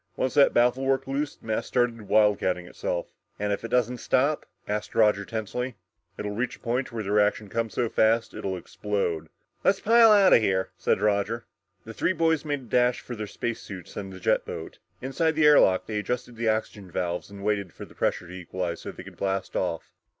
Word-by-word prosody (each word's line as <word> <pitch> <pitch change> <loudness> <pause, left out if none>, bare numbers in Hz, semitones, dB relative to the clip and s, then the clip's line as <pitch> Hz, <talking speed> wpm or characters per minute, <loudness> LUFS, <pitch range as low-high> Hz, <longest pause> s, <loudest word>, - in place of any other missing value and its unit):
Once 130 - -1
that 145 -2 +6
baffle 125 +2 +3
worked 135 0 +1
loose, 140 +2 -2
the - - -22
mass 110 -1 -1
started 120 -1 +1
wildcatting 100 -4 +2
itself." 90 0 -4 0.3
"And 105 0 -1
if 100 - -4
it - - -3
doesn't 125 0 +1
stop?" 140 +6 +1 0.2
asked 105 0 -3
Roger 105 -2 +4
tensely. 115 +4 -4 0.4
"It'll 105 - -3
reach 120 +4 -2
a - - -22
point 125 +3 -2
where 115 -2 -4
the 100 - -3
reaction 105 0 +2
comes 115 0 -2
so 120 - +1
fast 115 +1 +2
it'll 95 -1 -3
explode!" 90 -4 -3 0.3
"Let's 195 - +3
pile 230 0 +6
out 200 -3 +6
of - - +7
here!" 95 -3 0
said - - 0
Roger. 105 +2 0 0.4
The 115 - -8
three 170 - +1
boys 160 -3 +2
made 145 -2 -2
a - - -13
dash 125 +1 +2
for 120 - -7
their 105 -1 -5
space 115 +3 -4
suits 90 -4 -9
and 95 -2 -5
the 95 - -9
jet - - +2
boat. - - -7 0.2
Inside 160 +5 +1
the 155 -1 +3
air 150 -1 +8
lock, 95 -1 +3
they 105 -1 -2
adjusted 120 +3 -3
their 110 -1 +2
oxygen 105 -3 -9
valves 90 +1 -3
and 100 -1 -10
waited 100 -3 0
for - - -9
pressure - - -2
to 90 - -10
equalize 90 -1 -4
so - - -6
they - - -10
could - - -13
blast 95 -1 -2
off. - - -2
110 Hz, 210 wpm, -26 LUFS, 100-125 Hz, 0.4 s, air